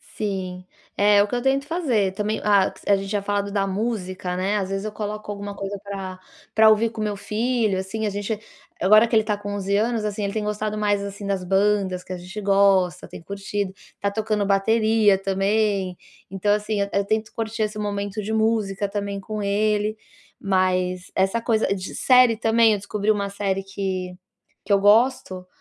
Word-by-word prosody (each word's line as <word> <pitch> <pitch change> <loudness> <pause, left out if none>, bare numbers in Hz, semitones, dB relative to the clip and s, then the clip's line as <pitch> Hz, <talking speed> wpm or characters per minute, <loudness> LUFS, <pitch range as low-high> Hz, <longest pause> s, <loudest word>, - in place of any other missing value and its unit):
Sim, 185 -3 -4 0.3
é, 205 0 +5
o - - -2
que 205 - -10
eu 245 - -1
tento 270 +2 +1
fazer, 255 - 0
também, 210 +2 -2
ah, 200 -2 +4 0.2
a 200 - +5
gente 195 0 -4
tinha 205 -1 -1
falado 200 0 -1
da 200 -1 +1
música, 190 -3 -3
né, 195 +3 0
às 190 -1 -2
vezes 195 +1 -3
eu 215 - -3
coloco 210 0 -5
alguma 205 0 -6
coisa 195 0 -5
pra 195 -2 -6 0.3
pra 220 0 +6
ouvir 220 +1 +3
com 225 -1 -6
meu 210 -1 -1
filho, 215 0 0
assim, 215 +4 -3
a 210 - +1
gente 205 +2 -3 0.4
agora 215 +5 +6
que 230 - 0
ele 220 - +5
tá 210 -1 -1
com 205 0 -5
11 200 0 -1
anos, 220 +1 0
assim, 210 0 -3
ele 200 - -2
tem 220 - -2
gostado 210 0 -2
mais 205 -1 +1
assim 200 0 -7
das 195 -2 -1
bandas 195 -1 +1
que 185 - -7
a - - -5
gente 180 +4 -8
gosta, 195 -3 +3
tem - - -11
curtido, 200 0 -4 0.2
está 200 0 -2
tocando 215 -1 -1
bateria 215 +1 +3
também, 195 -1 0 0.3
então 195 +2 +1
assim, 210 0 -1
eu 200 0 0
tento 215 +1 -1
curtir 225 0 -2
esse 210 0 -3
momento 205 0 -3
de 215 +2 -4
música 215 -3 +1
também 200 0 -4
com 215 +1 -5
ele, 210 +1 0 0.4
mas 185 -2 0
essa 195 +5 +1
coisa 225 -1 +1
de 185 -1 -6
série 250 -3 +5
também, 225 0 +4
eu - - 0
descobri 205 +1 -3
uma 200 -2 +1
série 195 -1 -2
que, 190 -2 -4 0.5
que 200 - -4
eu 200 - +5
gosto, 205 -3 +3
205 Hz, 190 wpm, -23 LUFS, 195-215 Hz, 0.5 s, pra